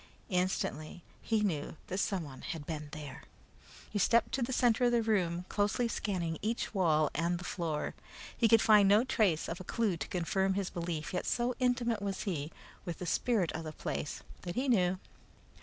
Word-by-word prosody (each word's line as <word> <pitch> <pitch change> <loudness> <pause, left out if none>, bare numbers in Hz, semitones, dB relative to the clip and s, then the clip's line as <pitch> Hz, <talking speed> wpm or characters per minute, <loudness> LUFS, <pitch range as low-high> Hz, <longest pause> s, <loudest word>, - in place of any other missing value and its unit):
Instantly 180 -4 -1 0.2
he 220 -2 +1
knew 160 -6 -2
that 185 - -3
someone 165 -11 -2
had 160 -4 -5
been 155 -2 -5
there. 145 -2 -7 0.7
He 205 - -1
stepped 230 +4 +3
to 270 - -1
the 240 +2 -1
center 245 -1 +3
of 240 - +4
the 235 -1 +3
room, 180 -5 +1
closely 205 +4 +1
scanning 175 -8 -2
each 225 +2 -2
wall 155 -6 +3
and 170 +3 0
the 175 - -8
floor. 165 -4 -2 0.4
He 230 - +3
could 225 0 +6
find 210 -3 +6
no 210 +3 +6
trace 205 -10 +1
of 165 - -4
a - - -6
clue 210 -2 0
to - - -4
confirm 190 +2 0
his 195 -2 -2
belief, 170 -3 -4
yet 180 - -2
so 240 +1 +1
intimate 245 -3 +1
was 200 -1 -2
he 160 -6 -3 0.3
with 175 -3 -5
the 180 - -5
spirit 190 0 +1
of 160 - -5
the 155 -1 -6
place 145 - -4 0.2
that 175 -1 -5
he 260 +3 0
knew. 185 -7 +3
185 Hz, 190 wpm, -32 LUFS, 165-220 Hz, 0.7 s, could